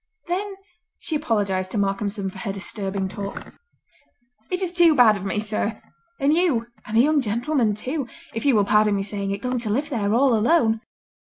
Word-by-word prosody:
Then 390 +3 -3 0.4
she 320 - -4
apologised 205 -10 0
to - - -1
Malcolmson 200 0 -1
for - - -11
her 215 -5 -3
disturbing 195 0 -3
talk. 200 +1 -7 1.0
"It 365 - -1
is 365 -2 -2
too 345 -3 +5
bad 235 -5 +6
of 195 - -6
me, 195 +1 -1
sir, 215 0 -2 0.4
and 280 +1 +3
you—and 235 -10 -1
a - - +8
young 295 +2 +3
gentlemen, 235 0 0
too—if 250 -1 -5
you 280 -4 +4
will 205 -2 +3
pardon 210 0 +3
me 195 - -1
saying 200 -1 -4
it, 200 0 -4
going 250 0 -1
to 230 -2 -4
live 285 +8 -1
there 205 -5 0
all 260 +1 +4
alone. 225 -2 +3
220 Hz, 180 wpm, -23 LUFS, 200-280 Hz, 1.0 s, a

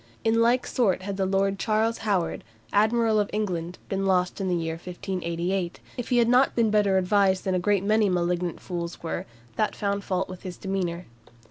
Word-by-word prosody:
In 225 +1 +3
like 240 +2 +3
sort 195 -7 +1
had 200 0 -4
the 190 -1 +1
Lord 195 0 +1
Charles 225 +1 +1
Howard, 195 -6 -1 0.3
Admiral 220 +1 +3
of 205 - 0
England, 180 -5 -2
been 195 0 -2
lost 185 +1 +1
in 190 - -1
the 180 - +1
year 165 -1 -2
1588, 175 +1 -3 0.2
if 245 - -5
he 245 - +3
had 235 -1 +4
not 250 +3 +4
been 230 -3 +2
better 205 -2 +3
advised 190 0 +2
than 190 - 0
a 185 - +2
great 200 +1 +1
many 210 0 +3
malignant 175 -1 -1
fools 170 -2 -5
were, 165 - -3 0.3
that 215 - 0
found 200 -1 -1
fault 185 -1 -1
with 185 -1 -9
his 180 -2 -7
demeanour. 185 -3 -3
195 Hz, 195 wpm, -26 LUFS, 180-215 Hz, 0.3 s, had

